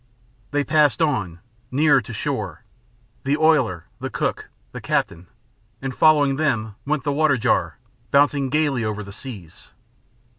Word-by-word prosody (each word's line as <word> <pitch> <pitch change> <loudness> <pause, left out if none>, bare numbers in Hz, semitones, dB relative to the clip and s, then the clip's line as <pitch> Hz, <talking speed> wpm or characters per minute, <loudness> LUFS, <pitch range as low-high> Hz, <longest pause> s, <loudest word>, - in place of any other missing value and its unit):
They 145 0 0
passed 150 -5 +3
on, 100 - -1 0.3
nearer 145 +2 +4
to - - -10
shore - - -4 0.6
the 140 +2 +1
oiler, 145 - +2
the - - -4
cook, - - -3 0.2
the - - -8
captain 85 +2 -2 0.5
and 135 -1 -4
following 145 -3 +4
them 115 -9 0
went 150 -1 0
the 145 - 0
water 150 -2 +3
jar, 110 - 0 0.3
bouncing 140 +1 +3
gaily 145 -4 +1
over 105 -1 -3
the 100 0 -10
seas. 105 - -10
140 Hz, 140 wpm, -22 LUFS, 110-150 Hz, 0.6 s, nearer